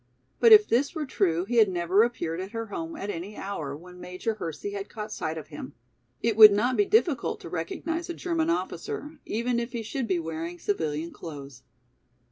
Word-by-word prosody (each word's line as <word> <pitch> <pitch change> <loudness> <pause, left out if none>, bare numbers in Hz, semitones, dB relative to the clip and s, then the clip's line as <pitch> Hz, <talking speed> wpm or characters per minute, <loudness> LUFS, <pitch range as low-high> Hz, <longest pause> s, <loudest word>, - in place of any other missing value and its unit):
But 465 - +6
if 425 -1 +9
this 280 +8 +1
were 310 -2 -2
true 180 - +1
he 240 +3 -1
had 215 -3 +6
never 180 +2 +2
appeared 175 -8 -1
at 190 +4 -6
her 230 0 -3
home 330 0 -4
at 205 -9 -4
any 190 +5 -6
hour 155 -8 -4
when 180 +2 -13
Major 180 +5 -3
Hersey 190 0 -5
had 200 -1 -5
caught 215 -1 -6
sight 160 -5 -3
of 155 - -8
him. 145 -2 -8 0.5
It 230 -2 +2
would 215 -1 +11
not 240 +5 +2
be 410 - +3
difficult 380 - +2
to - - -8
recognize 325 - -3
a 345 - -3
German 335 -2 -1
officer, 325 -2 -3
even 235 +2 0
if 235 +1 -4
he 235 -2 -3
should 245 +2 -3
be 185 -3 +1
wearing 165 +1 -4
civilian 160 -4 -2
clothes. 140 -6 -9
205 Hz, 200 wpm, -27 LUFS, 170-255 Hz, 0.5 s, would